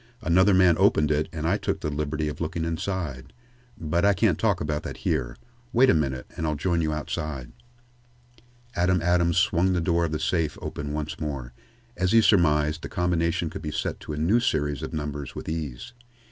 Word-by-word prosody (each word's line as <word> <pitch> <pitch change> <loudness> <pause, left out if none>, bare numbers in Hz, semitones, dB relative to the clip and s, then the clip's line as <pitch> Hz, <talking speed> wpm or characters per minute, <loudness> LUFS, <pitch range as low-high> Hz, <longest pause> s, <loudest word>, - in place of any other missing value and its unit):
"Another 95 +2 +4
man 90 -3 +5
opened 75 -6 +4
it 75 +1 0
and 80 -1 -3
I 95 +4 +2
took - - -2
the 75 - -2
liberty 75 +1 -2
of 75 - -5
looking 85 0 -2
inside. 85 -5 -4 0.5
But 80 +2 0
I 100 -1 +4
can't 95 -4 +2
talk 105 -5 +2
about 75 0 -2
that - - -7
here. - - -1 0.4
Wait 130 +3 +6
a - - +3
minute 65 -5 -1
and 80 - -2
I'll 75 - 0
join 85 +3 0
you 80 -1 0
outside." 75 -3 -4 1.2
Adam 90 +1 +2
Adams 85 -1 +2
swung 90 0 +3
the 90 - +1
door 85 0 +1
of 80 - -3
the 75 - -2
safe 80 +1 0
open 75 0 -5
once 75 0 -4
more. 70 -6 -4 0.4
As 90 +1 0
he 115 - +7
surmised, 75 -6 +3
the - - -6
combination 85 -1 0
could - - -7
be 75 - -4
set - - -3
to - - -7
a - - -5
new 90 +10 +3
series 75 - 0
of - - -5
numbers 75 -3 -5
with - - -7
ease. 80 - -5
80 Hz, 200 wpm, -26 LUFS, 75-90 Hz, 1.2 s, he